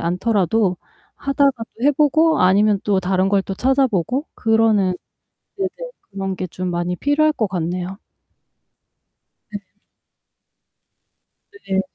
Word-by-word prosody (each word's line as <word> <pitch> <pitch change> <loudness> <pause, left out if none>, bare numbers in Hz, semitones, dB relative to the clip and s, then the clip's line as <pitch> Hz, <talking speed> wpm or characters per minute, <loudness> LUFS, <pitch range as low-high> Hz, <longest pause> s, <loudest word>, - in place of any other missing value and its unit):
않더라도 185 +1 +1 0.4
하다가도 275 -4 0
해 290 - +5
보고 310 +3 +3
아니면 200 +3 +4
또 200 -2 +1
다른 185 +1 +1
걸 200 -1 +2
또 195 - -5
찾아보고 260 - +1
그러는 220 -5 +2 0.6
네네. 385 -1 -1 0.4
그런 195 -1 -4
게 185 - -4
좀 180 +2 -5
많이 175 +1 -2
필요할 300 - +2
것 220 -7 -1
같네요. 180 +1 -4 1.5
네. 205 -1 -6 2.1
네. 190 0 +1
200 Hz, 215 characters per minute, -20 LUFS, 185-265 Hz, 2.1 s, 해